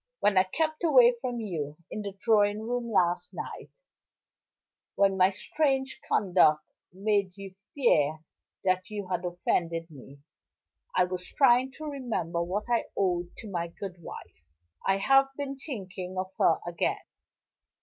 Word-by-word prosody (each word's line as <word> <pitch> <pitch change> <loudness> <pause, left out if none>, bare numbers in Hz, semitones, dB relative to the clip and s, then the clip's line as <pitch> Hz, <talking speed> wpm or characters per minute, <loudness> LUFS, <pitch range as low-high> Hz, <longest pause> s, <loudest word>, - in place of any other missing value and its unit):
"When 205 - +3
I 185 - +7
kept 315 - -1
away 255 -7 +6
from 245 -2 -3
you 155 -9 -4
in 215 - -4
the 200 -1 -6
drawing 210 -1 +3
room, 240 +1 -2
last 175 -4 +1
night - - -7 1.3
when 195 -1 +3
my 185 0 +5
strange 265 +6 -1
conduct 170 -6 +3 0.3
made 200 0 0
you 195 -1 -9 0.2
fear 155 - +2 0.4
that 185 +1 +1
you 205 -2 -5
had 180 -1 -1
offended 170 -1 -1
me 140 0 -14 0.7
I - - +5
was 180 0 -4
trying 260 -1 +4
to 310 - -8
remember 240 - -2
what 185 +5 -2
I 235 -1 +1
owed 175 -3 -1
to 215 -3 -8
my 170 -2 -2
good 180 +1 -8
wife. 80 - -11 0.4
I 195 0 +3
have 270 +7 +5
been 280 -1 -3
thinking 190 - -6
of 185 0 -3
her 165 - +4
again. 175 0 -1
195 Hz, 145 wpm, -28 LUFS, 175-240 Hz, 1.3 s, I